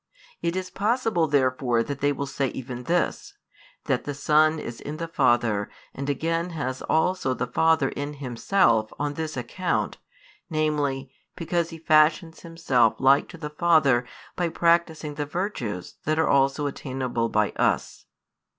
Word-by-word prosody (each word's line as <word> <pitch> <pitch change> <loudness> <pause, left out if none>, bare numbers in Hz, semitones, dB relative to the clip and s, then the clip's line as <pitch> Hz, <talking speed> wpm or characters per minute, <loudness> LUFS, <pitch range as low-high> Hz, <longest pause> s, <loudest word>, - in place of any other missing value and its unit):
It 170 +1 -1
is 185 -1 -4
possible 215 -5 +1
therefore 130 -4 +1
that 140 +2 -5
they 145 +1 +2
will 140 0 -3
say 140 0 -1
even 125 -1 -7
this, 175 0 -1 0.5
that - - 0
the 145 - -5
Son 155 +2 +3
is 120 -6 -7
in 150 +2 -6
the 165 0 -4
Father 120 -9 +1 0.2
and 140 +1 -5
again 165 +4 -1
has 130 -2 -3
also 160 -5 +1
the 125 - -2
Father 155 +2 +2
in 145 +1 -5
Himself 120 - +1
on 145 0 -2
this 155 -1 -4
account, 120 -1 -2 0.5
namely, 145 -4 -1 0.2
because 170 0 -1
He 165 - -8
fashions 160 +1 +3
Himself 135 -9 +1
like 135 +2 +4
to 175 - -10
the 150 -2 -6
Father 150 -6 +3 0.3
by 175 -1 0
practising 165 -2 +1
the 145 0 -4
virtues 145 - -4
that 155 +1 +1
are 160 - +2
also 140 +1 +2
attainable 130 -4 -2
by 105 -1 +1
us. - - -1
145 Hz, 150 wpm, -25 LUFS, 130-165 Hz, 0.5 s, like